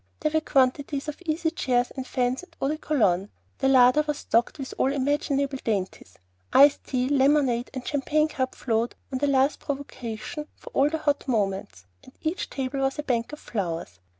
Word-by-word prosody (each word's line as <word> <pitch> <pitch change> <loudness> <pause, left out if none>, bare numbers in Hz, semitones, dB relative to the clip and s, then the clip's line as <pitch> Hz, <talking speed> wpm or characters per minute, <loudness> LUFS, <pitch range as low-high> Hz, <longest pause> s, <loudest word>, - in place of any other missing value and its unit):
There 305 - +1
were 315 0 +2
quantities 275 +1 +1
of 300 +4 -6
easy 320 +1 0
chairs 250 -6 0
and 260 -1 -6
fans 250 0 0
and 365 - -17
eau 270 - 0
de 305 - -1
cologne; 205 - +1 0.3
the 270 - +2
larder 260 +2 +6
was 300 -1 -1
stocked 235 +1 +1
with 270 -2 -6
all 265 - +3
imaginable 280 0 0
dainties, 190 - -3 0.3
iced 285 +1 +6
tea, 255 -1 0
lemonade, 270 -3 +3
and 260 -2 -7
champagne 305 +1 +1
cup 260 -4 -3
flowed 230 0 -1 0.2
on 260 - -2
the 290 - +1
least 275 +1 +2
provocation 275 0 -5
for - - -12
all 280 +2 +3
the 320 - -1
hot 290 -3 -1
moments, 195 - -1 0.2
and 260 - -16
each 325 +3 -2
table 270 0 -3
was 270 +1 0
a 295 - -3
bank 235 -3 -1
of 300 - -7
flowers. 165 - -4
270 Hz, 185 wpm, -26 LUFS, 245-290 Hz, 0.3 s, larder